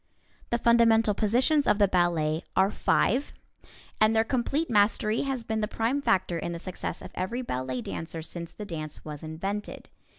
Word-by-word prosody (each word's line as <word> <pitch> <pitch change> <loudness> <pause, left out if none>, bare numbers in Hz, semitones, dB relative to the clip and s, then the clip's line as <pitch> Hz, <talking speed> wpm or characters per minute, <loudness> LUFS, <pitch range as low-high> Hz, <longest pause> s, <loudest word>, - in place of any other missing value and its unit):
The 235 - +1
fundamental 230 -2 +4
positions 255 +9 +2
of - - +4
the 205 -1 +4
ballet 170 -4 +1
are 190 +2 +4
five, 255 +6 +1 0.7
and 215 +1 +4
their 220 - +4
complete 275 +7 -1
mastery 215 +1 +2
has 270 -4 -2
been 220 -1 -2
the 210 - 0
prime 230 +6 -1
factor 180 -8 +1
in 170 - -4
the - - -4
success 180 -1 -5
of - - -9
every 235 +8 -3
ballet 130 - -3
dancer 165 0 -5
since 170 +1 -7
the 210 - -8
dance 155 -5 -6
was 150 -2 -7
invented. 195 +7 -5
210 Hz, 170 wpm, -27 LUFS, 170-235 Hz, 0.7 s, fundamental